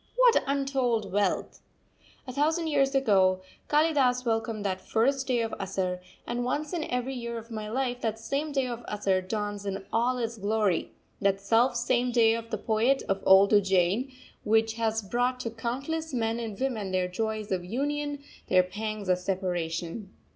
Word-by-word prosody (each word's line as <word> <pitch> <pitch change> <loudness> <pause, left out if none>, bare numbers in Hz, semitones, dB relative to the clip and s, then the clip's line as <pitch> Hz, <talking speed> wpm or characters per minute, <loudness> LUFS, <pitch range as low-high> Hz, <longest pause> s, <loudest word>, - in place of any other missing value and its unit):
What - - +5
untold 265 -7 0
wealth! 200 -1 0 0.6
A 255 - -7
thousand 315 +4 +1
years 275 -3 +2
ago 190 -7 +3 0.3
Kalidas 285 -5 +3
welcomed 225 -2 -1
that 185 -1 -1
first 265 +4 +1
day 245 -3 +2
of 225 -1 -3
Asarh; 185 -2 -2 0.3
and 240 +1 -2
once 290 +5 -2
in 330 -3 -1
every 250 +2 -2
year 235 -2 -4
of 230 +1 -9
my 215 -1 -5
life 245 +1 -1
that 220 -1 -1
same 275 +7 -2
day 270 -2 +1
of 240 -1 -5
Asarh 195 -3 0
dawns 205 +1 -3
in 195 0 -4
all 245 +3 +2
its 230 -2 -3
glory 205 -2 0 0.3
that 195 -1 +2
self 230 +5 +3
same 245 0 +1
day 230 -2 +5
of 230 0 -4
the 215 - -2
poet 230 +6 +1
of 195 0 0
old 190 +1 +7
Ujjain, 195 +5 +3 0.3
which 220 +1 +2
has 225 -1 -1
brought 245 +5 0
to 230 - -3
countless 270 +7 -3
men 225 -1 0
and 220 -4 -5
women 230 -8 -2
their 185 -1 +1
joys 215 +2 -3
of 185 -2 0
union, 285 +7 -2 0.2
their 185 0 +5
pangs 210 +2 -5
of 180 -1 +2
separation. 180 +1 -3
225 Hz, 170 wpm, -28 LUFS, 200-255 Hz, 0.6 s, old